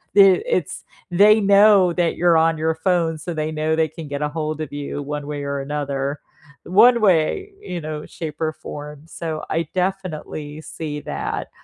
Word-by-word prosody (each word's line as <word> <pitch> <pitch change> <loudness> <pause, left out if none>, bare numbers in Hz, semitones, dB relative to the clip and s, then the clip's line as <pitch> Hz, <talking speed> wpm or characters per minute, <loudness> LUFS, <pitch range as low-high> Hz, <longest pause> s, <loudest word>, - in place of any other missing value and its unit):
it 195 - +6
it's 485 - -1 0.3
they 210 +4 +6
know 200 -3 +5
that 175 -1 0
you're 170 -1 +4
on 165 0 +3
your 160 +1 0
phone, 165 -1 0
so, 170 +2 -5
they 155 0 -2
know 155 0 0
they 160 0 +2
can 155 +1 -9
get 145 +1 -4
ahold 155 +1 -3
of 150 -2 -6
you 145 0 -4
one 145 0 -5
way 145 -1 -4
or 140 0 -3
another. 140 0 -3 0.4
One 235 +6 +5
way, 195 - +2
you 180 - -5
know, 150 0 -6
shape 160 -1 -7
or 155 - +1
form, 150 -1 -9
so, 165 -1 -5
I 165 -1 0
definitely 160 -5 -3
see 150 -2 -6
that, - - -4
160 Hz, 175 wpm, -21 LUFS, 150-180 Hz, 0.4 s, it